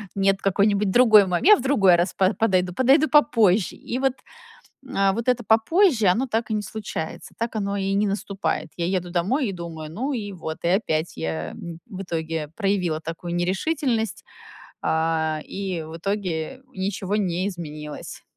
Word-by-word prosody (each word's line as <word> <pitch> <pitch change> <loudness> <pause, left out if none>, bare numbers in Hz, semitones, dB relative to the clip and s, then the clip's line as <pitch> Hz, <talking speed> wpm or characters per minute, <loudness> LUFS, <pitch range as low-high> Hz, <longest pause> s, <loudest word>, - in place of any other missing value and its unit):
нет, 195 0 +2
какой-нибудь 200 +1 +2
другой 220 -1 +7
момент, 180 - 0
я 425 - +10
в - - -5
другой 215 -9 +4
раз 175 +2 0
по 190 +2 +2
подойду, 185 -5 +1
подойду 270 - +4
попозже". 225 -10 +4
И 250 - -5
вот, 270 -1 +2 0.8
а, 195 0 +2
вот 230 +4 -4
это 250 -1 +2
попозже, 225 - +3
оно 220 +9 +3
так 230 -2 -2
и 215 - 0
не 210 - -2
случается, 205 -7 -6
так 230 0 -3
оно 200 -1 -1
и 195 0 -1
не 205 +1 +2
наступает. 195 -5 -2
Я 170 0 -2
еду 180 -2 -2
домой 205 - 0
и - - -2
думаю: 165 -3 -7
"Ну 260 - -2
и 210 -5 -4
вот". 160 -3 -6
И - - +1
опять 170 -4 0
я, 80 0 -3
м, 170 -1 -8
в 195 -6 -8
итоге 160 -3 -3
проявила 195 -6 0
такую 165 +2 -5
нерешительность, 225 - -1 0.6
а, 160 -1 0
и 190 -4 -4
в 160 +1 -9
итоге 195 +4 -3
ничего 190 0 -2
не 185 -2 0
изменилось. 150 -5 -7
195 Hz, 170 wpm, -24 LUFS, 170-220 Hz, 0.8 s, я